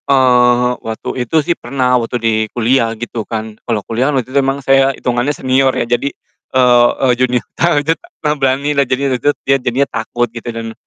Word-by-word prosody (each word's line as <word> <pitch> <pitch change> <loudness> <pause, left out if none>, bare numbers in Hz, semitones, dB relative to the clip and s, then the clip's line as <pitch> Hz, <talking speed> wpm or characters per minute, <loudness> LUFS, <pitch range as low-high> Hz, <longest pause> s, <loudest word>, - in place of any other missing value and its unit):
Eee, 125 -2 +4
waktu 110 -1 -6 0.2
itu 120 - -5
sih 170 - +2
pernah, 125 -2 -1
waktu 115 +1 -3
di 115 -1 0 0.3
kuliah, 120 0 +2
gitu 120 0 -5
kan. 110 0 -5
Kalau 115 -3 -2
kuliah 120 +5 0
kan, 145 - 0
waktu 130 0 -3
itu 140 - +4
memang 135 +1 -1
saya 135 0 +4
hitungannya 125 +4 -1
senior 130 +1 +2
ya. - - 0
Jadi, 120 +4 0 0.5
eee 125 -1 +5 0.2
eee, 125 - +4
junio 125 -1 +1
tawa 170 -2 +1
jud 165 0 0
a - - -17
ta 150 - 0
berani 140 +1 0
lah, 140 -1 +3
jadi 135 +1 0
waktu 125 - -1
itu - - +5
dia 135 0 +3
jadinya 125 +3 0
takut, 120 +2 -2
gitu. 120 0 -7
Dan, 115 -1 -6
125 Hz, 210 wpm, -15 LUFS, 120-135 Hz, 0.5 s, eee